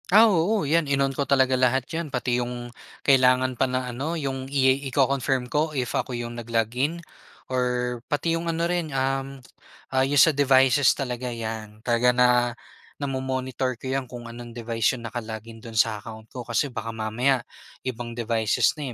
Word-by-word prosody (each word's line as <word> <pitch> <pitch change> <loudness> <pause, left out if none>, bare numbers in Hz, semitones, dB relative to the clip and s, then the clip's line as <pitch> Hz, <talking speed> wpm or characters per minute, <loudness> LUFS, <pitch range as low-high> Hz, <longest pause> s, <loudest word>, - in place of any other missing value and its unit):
Ah, 215 +5 +8
oo, 200 -2 +2
yan, 155 0 +2
in-on 135 -1 +1
ko 140 +1 -2
talaga 130 -2 +4
lahat 130 0 +2
yan, 165 -1 -3
pati 125 -2 0
yung 120 0 -5 0.3
kailangan 130 -1 +4
pa 125 - 0
na 125 -1 -2
ano, 150 +7 -3
yung 135 -3 -4
i 135 -1 +3
iko-confirm 135 -1 +1
ko 155 0 0
if 125 -2 -1
ako 125 -2 -2
yung 120 0 -5
nag-log 115 -1 -1
in 150 +7 -1 0.5
or 125 -1 0
pati 165 +3 0
yung 165 0 -2
ano 165 0 0
rin, 175 -2 -1
um, 135 +1 -1 0.6
ah, 130 - +3
yun 145 +1 0
sa 155 +3 +7
devices 135 -1 +4
talaga, 125 -2 -3
yan. 110 -2 -6
Talaga 120 0 +3
na 125 0 +6 0.7
namo-monitor 130 -1 -2
ko 130 - -5
yan, 135 0 -1
kung 120 -1 -9
anong 120 0 -9
device 115 -1 0
yung 120 -2 -6
naka-log 110 -2 -5
in 115 - -10
do'n 115 0 -10
sa 110 0 +2
account 110 +1 -10
ko, 125 -2 -7
kasi 120 +5 0
baka 115 -2 -5
mamaya 120 +4 +1 0.4
ibang 120 -2 -5
devices 115 +2 +1
na, 140 -5 -4
130 Hz, 175 wpm, -25 LUFS, 120-140 Hz, 0.7 s, Ah